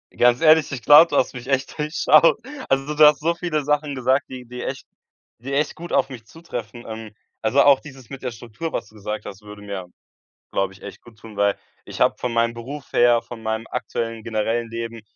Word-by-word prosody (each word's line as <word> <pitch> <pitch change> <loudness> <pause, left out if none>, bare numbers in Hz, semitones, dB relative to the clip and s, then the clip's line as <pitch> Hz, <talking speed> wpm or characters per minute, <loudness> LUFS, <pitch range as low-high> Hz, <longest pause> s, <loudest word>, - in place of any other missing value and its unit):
Ganz 120 0 +4
ehrlich, 160 -1 +5
ich 130 -3 -5
glaube, 150 +3 +9
du 145 - 0
hast - - +1
mich 125 -1 -9
echt 135 -1 -1
durchschaut. 155 +3 +4 0.3
Also, 135 +2 0
du 150 - +4
hast 150 -1 +7
so 165 +3 +1
viele 165 -3 -2
Sachen 150 0 0
gesagt, 130 +2 +1
die 130 -1 -8
die 125 +1 -8
echt 135 - -5 0.5
die 135 +4 -6
echt 150 +2 +1
gut 170 +1 -9
auf - - +2
mich 125 -4 -9
zutreffen. 120 -5 -8
Ähm, 110 -1 -8 0.3
also 140 - +3
auch 140 -2 +6
dieses 135 -4 -13
mit 135 - -8
der 130 - -3
Struktur, 115 +7 -7
was 115 - -4
du 110 - -21
gesagt 105 +1 -5
hast, 100 0 -9
würde 105 0 -12
mir, 100 -3 -6 0.6
glaube 95 0 -1
ich, 95 - -18
echt 100 - -9
gut 115 -2 -17
tun, 110 -2 -13
weil 100 -1 +2 0.3
ich - - -8
habe - - +4
von 125 -1 -3
meinem 115 0 +1
Beruf 130 +5 -8
her, 120 -1 +4
von 115 -1 -10
meinem 110 0 -2
aktuellen, 115 -2 -4
generellen 115 +1 -1
Leben 115 0 -6
125 Hz, 220 wpm, -22 LUFS, 115-145 Hz, 0.6 s, glaube